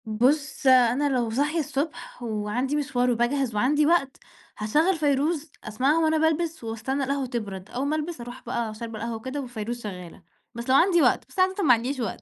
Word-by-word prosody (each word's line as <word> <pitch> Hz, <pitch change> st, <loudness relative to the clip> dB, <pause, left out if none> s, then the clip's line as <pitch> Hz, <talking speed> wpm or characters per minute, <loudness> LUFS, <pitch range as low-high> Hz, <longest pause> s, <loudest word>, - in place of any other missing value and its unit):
بُصّ 265 Hz, +6 st, +1 dB
أنا 255 Hz, +2 st, +5 dB
لو 245 Hz, -4 st, 0 dB
صاحية 290 Hz, +8 st, 0 dB
الصبح 290 Hz, -2 st, -4 dB
وعندي 225 Hz, +5 st, -2 dB
مشوار 250 Hz, -4 st, +1 dB
وباجهز 240 Hz, 0 st, 0 dB
وعندي 290 Hz, +8 st, +3 dB
وقت، 290 Hz, -5 st, +2 dB, 0.4 s
هاشغّل 305 Hz, -, +2 dB
فيروز 300 Hz, +1 st, 0 dB
أسمعها 260 Hz, +9 st, +1 dB
وأنا 315 Hz, 0 st, +3 dB
بالبِس 320 Hz, -1 st, 0 dB
وأستنى 230 Hz, +5 st, -2 dB
القهوة 275 Hz, 0 st, -1 dB
تبرد، 205 Hz, -6 st, -5 dB
أوّل 260 Hz, +3 st, -2 dB
ما 305 Hz, -, 0 dB
ألبِس 310 Hz, -2 st, -4 dB
أروح 240 Hz, +1 st, -9 dB
بقى 230 Hz, -2 st, -2 dB
شاربة 225 Hz, 0 st, -7 dB
القهوة 230 Hz, +1 st, -3 dB
وكده 260 Hz, +6 st, -5 dB
وفيروز 240 Hz, -1 st, -5 dB
شغّالة، 180 Hz, -4 st, -8 dB, 0.3 s
بس 235 Hz, +2 st, -6 dB
لو 260 Hz, -, +5 dB
عندي 345 Hz, +3 st, +5 dB
وقت، -, -, +3 dB
بس -, -, -9 dB
عادةً 375 Hz, +2 st, +2 dB
ما 255 Hz, -, +6 dB
عنديش 250 Hz, +4 st, -1 dB
وقت، 225 Hz, -6 st, -3 dB
260 Hz, 180 wpm, -25 LUFS, 230-295 Hz, 0.4 s, ما